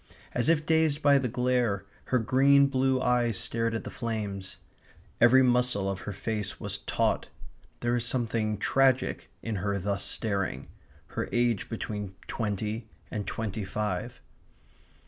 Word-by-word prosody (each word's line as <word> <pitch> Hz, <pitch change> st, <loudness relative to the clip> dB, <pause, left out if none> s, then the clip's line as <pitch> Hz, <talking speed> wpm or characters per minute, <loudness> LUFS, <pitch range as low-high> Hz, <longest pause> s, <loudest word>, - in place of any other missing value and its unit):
As 120 Hz, +4 st, +1 dB
if 155 Hz, -2 st, +3 dB
dazed 160 Hz, -2 st, +2 dB
by 140 Hz, -1 st, +6 dB
the 130 Hz, -, -1 dB
glare, 125 Hz, -4 st, +1 dB, 0.2 s
her 130 Hz, -, +2 dB
green 135 Hz, +4 st, +5 dB
blue 130 Hz, -1 st, +2 dB
eyes 120 Hz, -4 st, +2 dB
stared 115 Hz, +2 st, -1 dB
at 115 Hz, -, -3 dB
the -, -, -7 dB
flames. 105 Hz, -5 st, -4 dB, 0.6 s
Every 130 Hz, +3 st, +7 dB
muscle 125 Hz, -5 st, +2 dB
of 95 Hz, -1 st, -2 dB
her -, -, -2 dB
face 105 Hz, +1 st, -3 dB
was -, -, -3 dB
taut. -, -, 0 dB, 0.5 s
There 120 Hz, -, +1 dB
was 120 Hz, -1 st, +1 dB
something 115 Hz, -3 st, 0 dB
tragic 130 Hz, +4 st, +2 dB
in 110 Hz, -2 st, -2 dB
her 100 Hz, +2 st, -1 dB
thus 100 Hz, +1 st, -2 dB
staring 100 Hz, -4 st, -2 dB, 0.4 s
her -, -, -3 dB
age 120 Hz, -3 st, +1 dB
between 105 Hz, -4 st, -4 dB
twenty 110 Hz, +1 st, -3 dB, 0.2 s
and 105 Hz, -2 st, -3 dB
twenty 110 Hz, -2 st, -3 dB
five. 95 Hz, -1 st, -3 dB
115 Hz, 145 wpm, -28 LUFS, 105-125 Hz, 0.6 s, Every